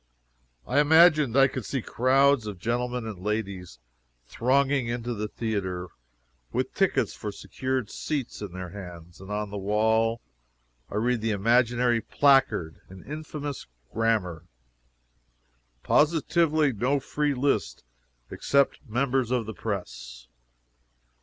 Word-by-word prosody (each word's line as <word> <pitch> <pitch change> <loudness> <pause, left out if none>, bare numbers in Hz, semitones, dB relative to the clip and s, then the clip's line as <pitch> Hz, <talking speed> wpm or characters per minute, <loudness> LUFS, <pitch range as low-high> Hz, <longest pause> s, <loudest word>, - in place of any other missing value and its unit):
I 135 +4 +1
imagined 150 -4 +5
I 135 0 +7
could 130 -2 -5
see 125 +4 -3
crowds 130 0 +3
of 105 -3 -6
gentlemen 120 +3 -2
and 105 -5 -6
ladies 100 -3 -4 0.5
thronging 135 - +1
into 120 0 -3
the 105 -1 -3
theatre, 95 -6 -3 0.6
with - - -2
tickets - - +1
for - - -6
secured 130 -4 -4
seats 145 -8 -4
in 105 -3 -6
their 90 0 -7
hands, 90 -2 -10
and 95 - -11
on 105 -1 -3
the 100 - -4
wall, 110 +3 +1 0.7
I - - -7
read 120 +2 +1
the 115 - -1
imaginary 120 +3 +2
placard, 135 - +2
in 95 0 -12
infamous 150 -1 -6 0.3
grammar, 100 -7 0 1.4
"POSITIVELY 155 -1 +2
NO 125 +6 +1
FREE 145 +1 -1
LIST, 140 +2 -1 0.5
EXCEPT 140 -1 +1
MEMBERS 125 +1 0
OF 125 -2 0
THE 110 - -6
PRESS!" 60 - -6
115 Hz, 120 wpm, -26 LUFS, 100-135 Hz, 1.4 s, I